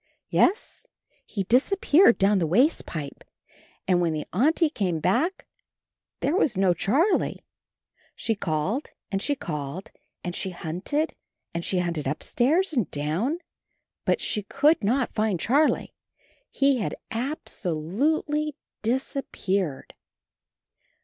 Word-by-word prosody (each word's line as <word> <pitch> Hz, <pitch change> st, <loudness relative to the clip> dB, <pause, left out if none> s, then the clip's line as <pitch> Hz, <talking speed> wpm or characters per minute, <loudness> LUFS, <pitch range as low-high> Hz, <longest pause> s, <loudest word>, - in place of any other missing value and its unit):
Yes, 425 Hz, +5 st, +1 dB, 0.4 s
he 200 Hz, -, -2 dB
disappeared 290 Hz, -, +4 dB
down 195 Hz, 0 st, +3 dB
the 165 Hz, -, +1 dB
waste 250 Hz, -, +3 dB
pipe. 145 Hz, -4 st, -6 dB, 0.6 s
And 180 Hz, -1 st, +3 dB
when 165 Hz, -2 st, +1 dB
the 155 Hz, -1 st, -3 dB
Auntie 305 Hz, -, +3 dB
came 185 Hz, -, -1 dB
back 320 Hz, -, 0 dB, 0.8 s
there 295 Hz, -, +1 dB
was 280 Hz, -, +2 dB
no 190 Hz, -2 st, +4 dB
Charlie. 320 Hz, -, +1 dB, 0.7 s
She 225 Hz, -, 0 dB
called 195 Hz, -, -2 dB, 0.2 s
and 195 Hz, -1 st, -1 dB
she 285 Hz, -, +1 dB
called, 150 Hz, -, -5 dB, 0.3 s
and 175 Hz, -1 st, -4 dB
she 190 Hz, -, -1 dB
hunted 185 Hz, -, -2 dB, 0.4 s
and 170 Hz, 0 st, -3 dB
she 185 Hz, -, 0 dB
hunted 170 Hz, -5 st, -1 dB
upstairs 290 Hz, -, +1 dB
and 240 Hz, -, 0 dB
down, 165 Hz, -, -1 dB, 0.7 s
but -, -, +1 dB
she 210 Hz, -, 0 dB
could 285 Hz, +7 st, +2 dB
not 245 Hz, +5 st, +1 dB
find 215 Hz, -5 st, 0 dB
Charlie. 285 Hz, -, +2 dB, 0.6 s
He 275 Hz, -1 st, +3 dB
had 210 Hz, -, -2 dB, 0.2 s
ab 265 Hz, +7 st, -3 dB
so 180 Hz, -4 st, -2 dB
lute 200 Hz, -, 0 dB
ly 300 Hz, 0 st, -1 dB, 0.3 s
disappeared. 200 Hz, -, -2 dB
215 Hz, 125 wpm, -26 LUFS, 175-290 Hz, 0.8 s, disappeared